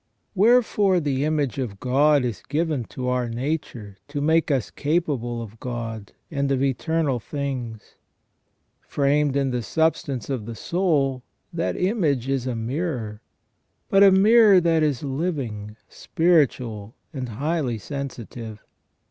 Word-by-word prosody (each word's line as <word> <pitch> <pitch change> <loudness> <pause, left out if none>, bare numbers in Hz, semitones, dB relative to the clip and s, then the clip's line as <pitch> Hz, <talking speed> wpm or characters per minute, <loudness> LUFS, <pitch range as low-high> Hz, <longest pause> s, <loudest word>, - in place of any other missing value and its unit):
Wherefore 210 -3 +4
the 140 -4 -1
image 145 -4 -1
of 105 -7 -4
God 140 +2 +3
is 120 -4 -4
given 155 -5 -1
to 125 +3 -6
our 125 -1 0
nature 120 -5 -4
to 145 0 -4
make 160 +3 +2
us 135 -5 0
capable 140 -7 -1
of 110 0 -12
God, 115 -4 -6 0.2
and 140 -2 -1
of 135 0 +1
eternal 140 0 0
things. 125 -4 -5 0.8
Framed 145 0 +1
in 135 -2 +1
the 125 -1 -1
substance 140 -1 -1
of 125 -6 -4
the 115 - -6
soul, 145 - 0 0.3
that 165 0 -2
image 165 - +1
is 135 -2 -1
a 125 - -2
mirror, 115 -3 -3 0.7
but 195 - +4
a 200 - +9
mirror 205 +1 +6
that 165 -2 +2
is 150 -4 0
living, 130 - -3
spiritual, 125 - 0 0.2
and 130 -4 -4
highly 140 +1 -1
sensitive. 115 -3 -7
140 Hz, 130 wpm, -23 LUFS, 120-160 Hz, 0.8 s, a